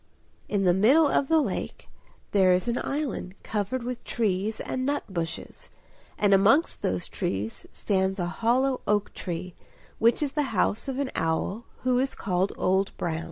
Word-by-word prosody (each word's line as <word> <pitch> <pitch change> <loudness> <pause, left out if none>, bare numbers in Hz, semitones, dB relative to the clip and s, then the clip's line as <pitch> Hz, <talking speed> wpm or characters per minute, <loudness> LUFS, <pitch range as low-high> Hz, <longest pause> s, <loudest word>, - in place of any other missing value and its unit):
In 200 -2 +1
the 180 -2 +4
middle 260 - +5
of 280 - +1
the 320 +1 +4
lake 230 -11 -3 0.4
there 190 -2 +5
is 180 +4 +1
an 235 - 0
island 275 -10 -3
covered 220 +4 -2
with 250 0 -5
trees 215 -1 -1
and 255 - -3
nut 285 +2 0
bushes; 170 -4 -5 0.5
and 205 -1 +3
amongst 220 - +4
those 90 -1 -1
trees 100 +3 -3
stands 190 -1 0
a 175 - 0
hollow 250 +8 +1
oak 205 0 +1
tree, 180 0 -5 0.5
which 235 +6 +3
is 285 - -1
the 275 -8 -2
house 210 +7 +1
of 265 -1 -3
an 280 -2 -1
owl 175 +7 -1 0.2
who 250 -1 +2
is 265 +1 0
called 185 0 0
Old 190 +1 +1
Brown. 160 -2 -2
210 Hz, 165 wpm, -27 LUFS, 185-255 Hz, 0.5 s, middle